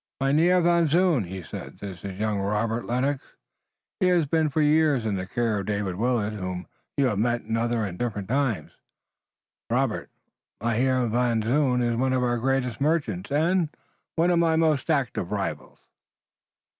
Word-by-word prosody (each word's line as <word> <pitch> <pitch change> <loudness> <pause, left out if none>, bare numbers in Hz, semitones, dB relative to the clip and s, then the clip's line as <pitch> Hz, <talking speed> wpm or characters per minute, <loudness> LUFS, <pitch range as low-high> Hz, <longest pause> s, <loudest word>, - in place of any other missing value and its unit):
"Mynheer 160 +7 +3
Van 170 -1 +3
Zoon," 165 - +3
he 95 +1 -7
said, - - -8
"this 95 -3 -8
is 95 -2 -6
young 105 -1 0
Robert 110 +4 -1
Lennox. 130 +3 0 0.8
He 185 - +3
has 175 -3 +3
been 160 +1 +1
for 150 - -1
years 150 -5 +3
in 110 - 0
the 95 -1 -3
care 115 -1 0
of 95 - -5
David 100 -3 -1
Willet, 110 0 0
whom 95 -3 -4 0.3
you 140 - +3
have 105 -6 0
met 120 +2 +1
in 115 - -2
other 115 0 0
and 90 -3 -6
different 105 -5 -3
times. 130 -3 0 1.0
Robert, - - 0 0.5
Mynheer 125 +3 +1
Van 120 -1 +1
Zoon 125 +1 +2
is 120 -1 0
one 130 +1 +1
of 130 -1 +1
our 120 -1 +1
greatest 125 -2 -1
merchants, 140 - 0
and 165 +3 +2 0.5
one 170 +2 +3
of 170 - +3
my 165 -1 +3
most 160 -2 +1
active 135 - 0
rivals." 100 -2 -4
125 Hz, 170 wpm, -25 LUFS, 105-150 Hz, 1.0 s, Mynheer